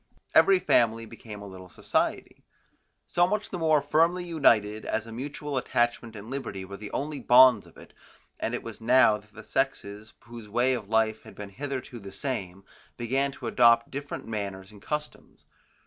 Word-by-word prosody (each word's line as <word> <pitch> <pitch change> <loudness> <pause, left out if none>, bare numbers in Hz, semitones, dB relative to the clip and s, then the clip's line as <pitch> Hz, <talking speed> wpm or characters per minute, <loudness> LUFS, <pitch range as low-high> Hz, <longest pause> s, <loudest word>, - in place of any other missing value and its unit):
Every 385 -1 +6
family 115 - +2
became 110 -2 -10
a - - -8
little 95 -1 -11
society, - - -2 0.6
so 175 0 +2
much 210 +2 -2
the 180 - -4
more 155 -3 +3
firmly 165 +5 +2
united, 110 -10 +2
as 115 - -2
a 115 - -10
mutual 140 +3 -4
attachment 120 -2 -1
and 105 +1 -9
liberty 120 -8 -5
were 100 +1 -9
the 105 0 -8
only 145 +1 -4
bonds 125 +1 +6
of - - -19
it; - - -15 0.5
and - - -2
it - - -6
was - - -9
now 120 -2 +5
that 105 0 -20
the 110 0 -12
sexes, 110 -6 -3
whose 115 -3 -11
way 120 +4 +2
of 110 -5 -5
life 110 -1 +1
had - - -14
been 105 -1 -8
hitherto 130 +2 -6
the 100 -2 -10
same, 100 -5 -5 0.3
began 135 +4 0
to - - -10
adopt 115 -1 +4
different 140 +1 -6
manners 100 -3 -5
and 105 -2 -15
customs. 150 +4 -6
120 Hz, 180 wpm, -27 LUFS, 105-140 Hz, 0.6 s, Every